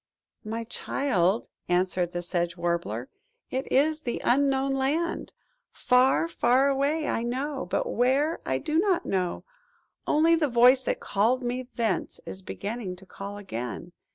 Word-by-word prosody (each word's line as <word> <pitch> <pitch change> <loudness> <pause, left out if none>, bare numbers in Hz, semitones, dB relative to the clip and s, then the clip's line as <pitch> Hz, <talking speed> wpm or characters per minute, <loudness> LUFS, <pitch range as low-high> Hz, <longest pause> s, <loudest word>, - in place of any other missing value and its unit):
"My 225 +1 -4
child," 225 -4 0 0.2
answered 180 0 +1
the 175 0 -4
Sedge 175 0 -2
Warbler, 170 -9 -2 0.2
" 485 0 -50
it 260 +1 -3
is 310 +3 +3
the 240 -5 -3
Unknown 270 +1 +2
Land! 290 +6 -1 0.4
Far, 255 +6 +3
far 270 -4 +3
away, 285 +3 0
I - - 0
know: 265 +4 -3
but - - 0
where, 285 - +1
I 130 - 0
do 305 - 0
not 375 -2 +1
know. 185 -2 -1 0.6
Only 320 +2 +4
the 315 -2 +1
voice 250 +2 +6
that - - -1
called 235 +6 +1
me 245 +1 -3
thence 230 -2 -1
is 190 - -3
beginning 200 0 -5
to 190 +1 -15
call 200 +2 -8
again. 145 - -6
245 Hz, 150 wpm, -27 LUFS, 190-280 Hz, 0.6 s, voice